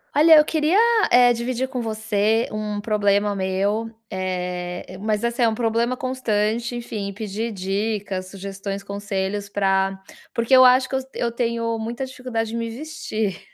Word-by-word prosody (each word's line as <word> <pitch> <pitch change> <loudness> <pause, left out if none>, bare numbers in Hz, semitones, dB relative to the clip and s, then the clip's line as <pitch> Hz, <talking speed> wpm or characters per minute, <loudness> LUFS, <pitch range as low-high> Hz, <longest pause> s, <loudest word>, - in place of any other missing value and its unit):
Olha, 315 +2 +8
eu 300 - +6
queria, 315 +4 +2 0.3
eh, 245 0 +6
dividir 245 +2 -2
com 255 -1 -4
você 220 0 0
um 210 -1 -3
problema 205 -1 +1
meu, 195 +4 -1 0.2
eh, 180 -1 -4
mas 210 +1 -1
assim 235 +1 -1
é - - +5
um 220 - -2
problema 235 +2 0
constante, 240 -2 -1
enfim, 220 -4 -4
e - - -7
pedir 215 +2 -4
dicas, 195 0 -2
sugestões, 195 0 -6
conselhos 200 0 -3
pra 195 -1 +1 0.3
porque 230 +3 +3
eu 255 - +9
acho 255 +1 +5
que 265 - -2
eu - - +2 0.2
eu 235 - -1
tenho 230 -1 -1
muita 235 +4 -4
dificuldade 250 -3 -4
de - - -4
me 230 0 -2
vestir, 225 - -4
220 Hz, 160 wpm, -22 LUFS, 200-240 Hz, 0.3 s, eu